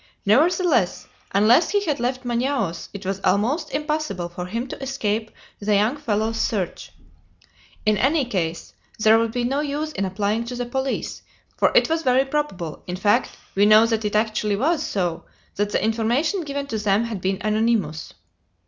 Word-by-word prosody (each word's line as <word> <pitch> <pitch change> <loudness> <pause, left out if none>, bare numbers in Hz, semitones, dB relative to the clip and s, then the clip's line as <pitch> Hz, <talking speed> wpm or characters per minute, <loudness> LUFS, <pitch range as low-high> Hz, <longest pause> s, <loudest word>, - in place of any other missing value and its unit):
Nevertheless, 250 - +2 0.2
unless 225 - +4
he 410 -1 +1
had 300 -6 -1
left 255 +2 -2
Manaos, 240 -7 -1
it 200 -1 -9
was 195 +1 -2
almost 225 - +1
impossible 300 - -2
for 180 +1 -6
him 230 +6 -3
to - - -7
escape 225 -5 -2 0.3
the 210 0 +1
young 215 +6 +2
fellows' 225 -5 -1
search. 195 -6 -2 0.9
In 215 -1 +3
any 285 +2 +2
case, 175 -8 -3 0.2
there 220 +1 +5
would 230 -1 0
be 245 +1 -2
no 270 +4 0
use 300 +1 -2
in 195 - -2
applying 205 +4 -1
to 245 +1 -5
the 245 0 -3
police, 265 +2 -3 0.3
for - - +3
it - - +5
was 325 0 0
very 260 -2 +3
probable 270 - -3
in 180 - -3
fact, 205 +3 +1 0.2
we 200 +1 +4
know 215 +1 +7
that 225 -1 0
it 210 0 -2
actually 215 -1 +1
was 305 +10 +1
so 175 -4 -2 0.3
that 205 +1 0
the - - 0
information 240 - 0
given 280 -1 -3
to 225 -6 -3
them 205 +1 +2
had 225 -5 -4
been 190 +1 0
anonymous. 215 -7 0
225 Hz, 175 wpm, -23 LUFS, 205-270 Hz, 0.9 s, know